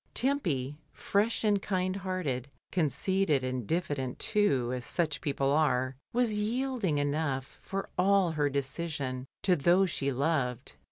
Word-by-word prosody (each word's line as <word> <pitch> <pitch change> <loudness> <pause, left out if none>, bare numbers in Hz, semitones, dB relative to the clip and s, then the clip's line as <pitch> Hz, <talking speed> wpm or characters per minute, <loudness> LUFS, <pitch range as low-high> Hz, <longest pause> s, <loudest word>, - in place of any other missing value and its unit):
Tempy, 160 - +1
fresh 210 +4 0
and 205 -2 +3
kind 185 -1 -1
hearted, 175 -10 -2 0.2
conceited 175 -2 +1
and 130 -4 -3
diffident 145 -7 -1
too, 135 - +1
as 125 -1 -3
such 155 -1 -1
people 140 -3 0
are, 130 -4 +2 0.2
was 230 -3 +1
yielding 230 - 0
enough, 145 -2 -1
for 195 0 -4
all 190 -1 +4
her 145 -2 +1
decision, 140 -2 -3 0.2
to 185 -2 +4
those 175 +4 +3
she 140 -2 -1
loved. 135 -3 -1
155 Hz, 130 wpm, -30 LUFS, 135-195 Hz, 0.2 s, all